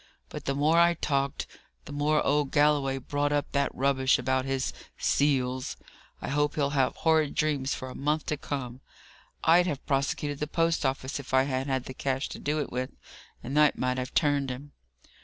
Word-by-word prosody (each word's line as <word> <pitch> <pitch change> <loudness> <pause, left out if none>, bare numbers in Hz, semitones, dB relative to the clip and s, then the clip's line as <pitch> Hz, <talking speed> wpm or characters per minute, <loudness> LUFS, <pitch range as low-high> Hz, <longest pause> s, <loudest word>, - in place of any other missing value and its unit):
but - - -8
the 135 - 0
more 155 +4 +3
I 170 0 +5
talked, 140 -3 -1 0.4
the - - -9
more 150 +1 +1
old 145 -1 +2
Galloway 145 -2 +3
brought 145 +2 -1
up 145 -1 0
that 140 0 +1
rubbish 130 0 +3
about 130 0 0
his 135 -1 -1 0.2
'seals!' 130 -3 +1 0.5
I - - -3
hope 145 +1 +1
he'll 140 -2 +1
have 135 -3 +1
horrid 160 -3 +2
dreams 145 -3 0
for 130 - -6
a 130 - -7
month 150 +2 -1
to 150 - -2
come! 130 -3 -5 0.6
I'd 175 +2 +5
have 145 -6 -3
prosecuted 140 +1 -1
the 150 - -2
post 165 -2 +1
office 130 +1 -3
if 135 -1 -3
I 130 - +5
had 135 0 -2
had 130 -2 0
the 130 - -7
cash 135 +1 -2
to - - -7
do 150 +2 -1
it 145 - -3
with, 125 +1 -2 0.5
and 135 +4 -4
that 150 -1 +5
might 125 0 0
have 125 +1 -5
turned 145 -3 +2
him." 135 +3 -7
140 Hz, 195 wpm, -28 LUFS, 130-150 Hz, 0.6 s, I